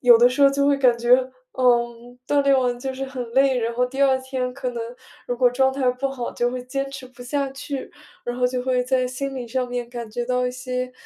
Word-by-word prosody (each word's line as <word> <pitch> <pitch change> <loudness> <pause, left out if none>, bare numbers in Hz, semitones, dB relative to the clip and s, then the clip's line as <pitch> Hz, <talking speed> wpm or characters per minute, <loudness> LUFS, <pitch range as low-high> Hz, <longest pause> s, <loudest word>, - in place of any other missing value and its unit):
有 245 -2 +8
的 240 +2 +6
时 255 +3 -3
候 280 - +8
就 280 0 +1
会 285 -1 +4
感 255 -3 +4
觉， 240 +1 +5 0.4
嗯， 240 -1 +1
锻 290 - +3
炼 275 -1 +4
完 245 -1 0
就 265 +1 -4
是 270 +1 -4
很 260 -3 -6
累， 265 0 +4
然 230 0 -2
后 250 +1 +2
第 265 +2 -6
二 265 -1 +4
天 260 -1 -3
可 260 -1 -3
能 240 -1 -5 0.5
如 245 - -1
果 245 0 +4
状 265 +2 +2
态 265 -2 +1
不 250 +2 -2
好， 260 -3 -4
就 240 - 0
会 250 0 -4
坚 275 +2 -3
持 270 -1 -8
不 255 0 -19
下 275 +2 -1
去， 270 0 -6 0.3
然 240 0 -3
后 250 0 +2
就 250 0 -2
会 250 -1 +1
在 255 0 +1
心 270 +2 -4
理 250 -3 -5
上 255 +2 -1
面 245 -1 -4
感 240 -2 -6
觉 240 +3 -3
到 250 0 +1
一 - - -1
些 250 0 -4
250 Hz, 270 characters per minute, -23 LUFS, 245-270 Hz, 0.5 s, 有